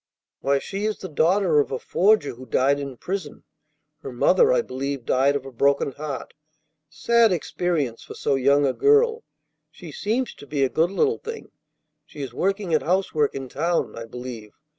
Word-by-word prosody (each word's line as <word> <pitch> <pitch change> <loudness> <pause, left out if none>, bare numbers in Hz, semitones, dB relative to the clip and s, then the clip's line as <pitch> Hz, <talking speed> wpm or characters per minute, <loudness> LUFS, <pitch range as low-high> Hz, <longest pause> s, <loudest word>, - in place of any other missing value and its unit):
"Why, 140 +1 +1
she 195 +8 -4
is 215 -1 -1
the 190 - -7
daughter 165 +1 +2
of 145 - 0
a 130 - -1
forger 195 +1 +2
who 130 +2 -12
died 140 +5 +2
in 140 -3 -6
prison. 185 -3 -5 0.6
Her 135 - -7
mother, 450 - +4
I - - +2
believe, 135 -1 -4
died 135 +2 +2
of 140 -2 -3
a 135 - -8
broken 140 +3 +1
heart. 145 0 -6 0.6
Sad 225 +8 +3
experience 165 -7 -1
for - - -10
so 145 - 0
young 140 +2 +3
a 130 - +1
girl. 450 - +3 0.5
She - - -11
seems 250 - -2
to 145 - -14
be 145 -2 0
a 135 - +2
good 165 +5 +1
little 435 - +1
thing. 460 0 -8 0.5
She 150 -2 -9
is 130 -3 -7
working 195 - -1
at 155 - +3
housework 165 -4 0
in 135 -1 -5
town, 165 +6 -1
I 115 - -7
believe. 120 -3 -8
150 Hz, 185 wpm, -23 LUFS, 135-195 Hz, 0.6 s, mother